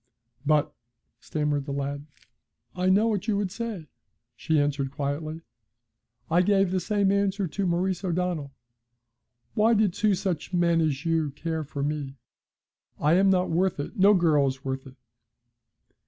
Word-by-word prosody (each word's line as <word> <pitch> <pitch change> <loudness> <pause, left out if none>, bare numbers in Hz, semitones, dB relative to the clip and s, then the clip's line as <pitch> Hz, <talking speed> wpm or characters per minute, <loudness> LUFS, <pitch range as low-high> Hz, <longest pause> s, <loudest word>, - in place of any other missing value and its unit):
'But 150 -1 +2 0.2
' - - -52
stammered 150 -2 -2
the 140 - -5
lad. 140 +1 -4 0.7
'I 185 0 +1
know 205 +4 +4
what 210 -2 -1
you 210 -2 +1
would 200 -2 -1
say,' 220 -6 -5 0.5
she 160 -1 +1
answered 140 -1 0
quietly. 150 +3 -4 0.9
'I 175 +2 +5
gave 195 -1 +2
the 185 - +1
same 200 +2 +1
answer 200 -1 +1
to 195 +4 -2
Maurice 180 +2 0
O'Donnell. 175 -5 -2 1.0
Why 225 +1 +3
did 210 -4 +2
two 210 0 +2
such 180 -2 -3
men 170 -1 +3
as 150 -1 -1
you 165 -2 +1
care 160 +3 -4
for 140 -1 -5
me? 145 -2 -3 0.8
I 150 +2 +3
am 190 +2 +4
not 185 -2 +2
worth 180 0 +1
it, 145 - -5
no 200 0 +5
girl 155 -6 +3
is 135 0 -5
worth 135 0 -4
it. 130 - -13
170 Hz, 155 wpm, -26 LUFS, 145-195 Hz, 1.0 s, I